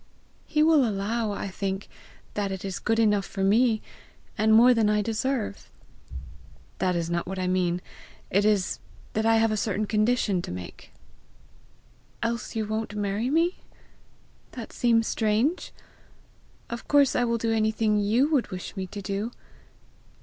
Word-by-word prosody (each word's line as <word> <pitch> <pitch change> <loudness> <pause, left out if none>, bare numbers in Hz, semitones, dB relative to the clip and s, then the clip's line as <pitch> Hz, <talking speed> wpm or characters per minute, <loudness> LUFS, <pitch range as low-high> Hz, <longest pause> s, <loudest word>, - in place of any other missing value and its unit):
"He 305 -1 +2
will 310 -3 +5
allow, 215 +1 -1
I 200 - -4
think, 195 +1 -4 0.5
that 200 -2 -2
it 190 0 -5
is 190 -2 -4
good 225 - 0
enough 210 -3 +3
for 195 0 -4
me 220 +3 +3 0.5
and 220 +1 +2
more 235 +3 +7
than 225 -3 +2
I 210 0 +2
deserve." 225 -1 -2 1.1
"That 180 -1 +1
is 170 -1 -1
not 170 0 -2
what 190 +1 -5
I 185 - -1
mean; 180 -1 0 0.5
it 200 +2 +3
is 205 -3 +1 0.3
that 220 +1 +1
I 225 - +5
have 225 0 +3
a - - +1
certain 210 0 -1
condition 215 -3 +1
to - - -7
make." 90 -1 -9 1.3
"Else 235 0 -3
you 220 -1 -1
won't 215 0 -3
marry 205 +3 -1
me? 335 +5 +2 1.0
That 235 -3 -8
seems 230 -2 +2
strange! 225 +12 0 1.0
Of 235 0 -7
course 285 -2 +4
I 245 - +2
will 235 -1 +1
do 225 0 0
anything 215 -1 +1
you 220 +7 +3
would 280 -6 +2
wish 185 +2 -7
me 190 -1 -4
to 200 +2 -8
do! 200 +3 -2
215 Hz, 155 wpm, -26 LUFS, 195-230 Hz, 1.3 s, more